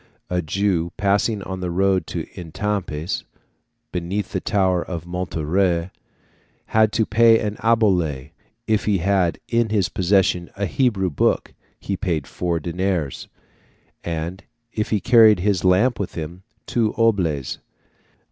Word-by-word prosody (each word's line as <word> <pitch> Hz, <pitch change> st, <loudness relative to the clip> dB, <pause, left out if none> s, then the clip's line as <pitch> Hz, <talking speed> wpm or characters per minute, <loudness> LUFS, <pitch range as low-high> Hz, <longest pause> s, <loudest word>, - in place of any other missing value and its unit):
A 90 Hz, 0 st, +1 dB
Jew, 85 Hz, 0 st, 0 dB
passing 100 Hz, +1 st, +1 dB
on 95 Hz, 0 st, -5 dB
the 90 Hz, -1 st, -3 dB
road 95 Hz, -1 st, +1 dB
of -, -, -2 dB
Etampes, 90 Hz, -2 st, -3 dB, 0.7 s
beneath 90 Hz, +3 st, -3 dB
the -, -, -1 dB
tower 95 Hz, -4 st, +1 dB
of 85 Hz, -2 st, -6 dB
Montlhéry, 90 Hz, 0 st, -1 dB, 0.7 s
had 110 Hz, -1 st, +3 dB
to 110 Hz, -, +2 dB
pay 115 Hz, +1 st, +5 dB
an 105 Hz, -1 st, -2 dB
obole; 90 Hz, -, +1 dB, 0.3 s
if 110 Hz, -2 st, +1 dB
he 105 Hz, -2 st, +2 dB
had 95 Hz, -1 st, +1 dB
in 115 Hz, -1 st, +1 dB
his 100 Hz, -5 st, +1 dB
possession 90 Hz, -2 st, +1 dB
a 100 Hz, -, 0 dB
Hebrew 100 Hz, -5 st, +1 dB
book, 70 Hz, -, 0 dB, 0.3 s
he 100 Hz, -, -3 dB
paid 85 Hz, -7 st, -2 dB
four 85 Hz, +4 st, -2 dB
deniers; 85 Hz, -3 st, -2 dB, 0.8 s
and, 85 Hz, +3 st, -4 dB, 0.3 s
if 105 Hz, -, -2 dB
he 105 Hz, -, +1 dB
carried 110 Hz, -4 st, +6 dB
his 100 Hz, -2 st, +1 dB
lamp 100 Hz, +7 st, +3 dB
with 100 Hz, -, -4 dB
him, 85 Hz, +3 st, -6 dB, 0.2 s
two 115 Hz, -3 st, 0 dB
oboles. 90 Hz, -, +1 dB
95 Hz, 135 wpm, -22 LUFS, 85-105 Hz, 0.8 s, carried